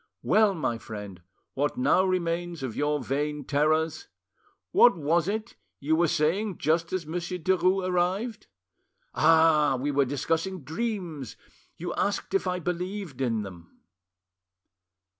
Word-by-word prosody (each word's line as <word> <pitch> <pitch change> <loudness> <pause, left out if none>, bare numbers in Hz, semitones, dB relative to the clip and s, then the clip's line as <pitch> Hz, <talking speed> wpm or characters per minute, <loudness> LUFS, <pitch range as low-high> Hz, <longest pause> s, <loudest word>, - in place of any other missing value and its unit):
Well, 215 -2 +4
my 120 -8 -2
friend, 105 -5 -8 0.3
what 145 - -1
now 255 -7 +3
remains 175 -3 -1
of 125 -4 -4
your 150 0 0
vain 145 +3 -2
terrors? 155 - +1 0.6
What 240 -6 +6
was 165 +2 +1
it 220 +3 -3 0.2
you 155 +3 +1
were 170 +1 +3
saying 180 +7 0
just 165 +3 0
as 185 -3 -2
Monsieur 175 +3 -4
Derues 185 +2 +1
arrived?... 190 +6 -1 0.7
Ah! 155 -3 +4
we 145 +3 -1
were 140 -1 +2
discussing 160 +6 -2
dreams, 165 - -4 0.4
you 175 +1 -4
asked 200 0 -2
if 195 -1 +1
I 180 0 0
believed 180 -3 -4
in 115 -4 0
them." 85 -4 -12
165 Hz, 130 wpm, -27 LUFS, 145-185 Hz, 0.7 s, What